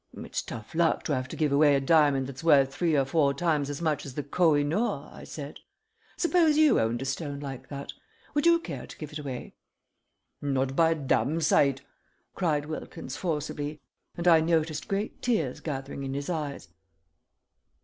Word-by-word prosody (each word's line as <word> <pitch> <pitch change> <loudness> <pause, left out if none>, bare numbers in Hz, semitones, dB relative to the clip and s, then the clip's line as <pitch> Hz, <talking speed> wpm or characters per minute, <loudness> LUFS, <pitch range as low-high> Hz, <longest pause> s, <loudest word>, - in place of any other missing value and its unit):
"It's - - -4
tough 110 - -9
luck 165 0 +2
to 150 - -1
have 130 0 -3
to - - -7
give 150 -3 +1
away 145 0 +5
a - - +3
diamond 140 -2 +3
that's 135 +3 -8
worth 140 -4 +5
three 165 -2 +1
or 135 - +3
four 140 0 +2
times 150 -3 0
as 145 +3 -5
much 155 -2 0
as 135 -3 -9
the 145 - -2
Koh 160 +2 +3
i 145 - +2
noor," 175 +12 -1
I - - -11
said. - - -8 0.6
"Suppose 335 -3 +3
you 310 -2 +5
owned 115 +3 0
a - - -5
stone 140 +1 -3
like 135 -3 -7
that. 140 0 -6 0.4
Would 295 +2 +2
you 340 0 +7
care 335 - -7
to - - -11
give 155 -1 -7
it 150 - -5
away?" 135 -4 -6 0.9
"Not 135 -1 0
by 165 +1 +4
a 165 - +2
damn 140 +1 +1
sight!" 140 -4 +3 0.5
cried 155 -5 0
Wilkins, 150 -3 -6
forcibly, 150 -3 -3 0.4
and 170 +1 -2
I 165 -2 +7
noticed 160 -2 0
great 200 +2 -3
tears 165 - 0
gathering 140 -2 -5
in 135 0 -4
his 140 +5 -3
eyes. 150 - -4
150 Hz, 190 wpm, -28 LUFS, 140-165 Hz, 0.9 s, you